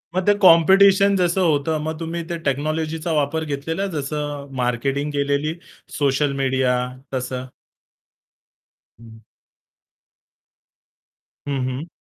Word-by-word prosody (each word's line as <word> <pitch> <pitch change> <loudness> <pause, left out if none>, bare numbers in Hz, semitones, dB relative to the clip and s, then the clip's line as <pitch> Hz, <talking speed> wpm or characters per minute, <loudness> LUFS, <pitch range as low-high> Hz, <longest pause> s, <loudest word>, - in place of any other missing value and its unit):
मग 185 0 0
ते 205 - +6
कॉम्पिटिशन 195 +3 +6
जसं 180 0 +1
होतं 155 +1 +1
मग 160 0 -4
तुम्ही 165 +1 -4
ते 170 - -2
टेक्नॉलॉजीचा 155 +3 -2
वापर 150 +1 0
घेतलेला 150 +4 -3
आहे 200 - -3
जसं 145 -1 -4
मार्केटिंग 135 +4 -1
केलेली, 145 +2 0 0.4
सोशल 140 0 +1
मीडिया 130 -1 +1 0.4
तसं. 130 0 -4 1.5
हं. 110 -1 -14 2.3
हं, 140 -1 -1
हं. 130 +6 -5
150 Hz, 105 wpm, -21 LUFS, 140-165 Hz, 2.3 s, ते